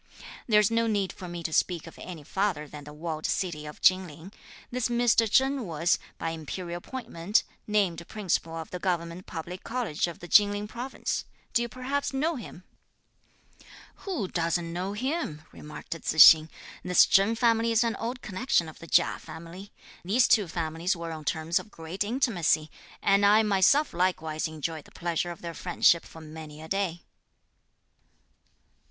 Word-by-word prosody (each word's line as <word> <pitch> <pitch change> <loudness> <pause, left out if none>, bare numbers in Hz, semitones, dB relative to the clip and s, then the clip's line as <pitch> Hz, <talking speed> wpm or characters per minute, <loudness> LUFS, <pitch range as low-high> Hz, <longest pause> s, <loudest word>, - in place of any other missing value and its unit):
There's 210 -2 +4
no 230 0 +2
need 200 -4 0
for 185 - -9
me 175 -1 -6
to 160 - -3
speak 175 -1 +1
of 165 - -12
any 170 -5 -8
farther 185 -3 -1
than 145 0 -10
the 150 - -9
walled 155 +1 -4
city 155 -5 -2
of 150 - -10
Chin 185 0 +5
Ling. 165 +6 -12 0.4
This 250 -1 -1
Mr. 235 -2 +3
Chen 265 +3 +3
was, 165 +1 +1 0.2
by 165 - -3
imperial 170 +2 -5
appointment, 205 -4 -1 0.2
named 185 -5 0
Principal 180 -5 -2
of 160 -1 -7
the 180 - -5
Government 175 -1 -2
Public 175 +3 -7
College 230 -11 -1
of 170 - -7
the 175 - -10
Chin 205 +2 +6
Ling 205 +1 -4
province. 245 +4 -4 0.3
Do 235 - +3
you 235 - -2
perhaps 270 +4 -3
know 315 +5 0
him?" 205 -7 -9 1.3
"Who 350 - -3
doesn't 170 -1 -1
know 185 +3 -3
him?" 250 - -3
remarked 150 0 -11
Tzu 165 -1 -3
hsing. 160 0 +9 0.3
"This 180 0 +5
Chen 200 +4 +4
family 230 0 +2
is 225 +1 +4
an 230 -1 0
old 245 +2 -4
connection 190 -3 0
of 155 - -11
the 165 - -11
Chia 175 - +3
family. 170 +5 -10 0.3
These 220 +8 +3
two 210 -5 +4
families 165 +2 -2
were 170 -1 -6
on 155 -1 -7
terms 160 +3 0
of 220 - -11
great 165 +2 -4
intimacy, 200 - +1 0.3
and 200 0 +4
I 210 +2 +6
myself 210 +9 +3
likewise 160 -3 0
enjoyed 160 0 -5
the - - -18
pleasure 170 0 -2
of 175 - -9
their 170 -1 -5
friendship 170 -1 +2
for 160 - -12
many 155 -1 -10
a 160 - -9
day." 185 -2 -2
180 Hz, 170 wpm, -28 LUFS, 165-215 Hz, 1.3 s, hsing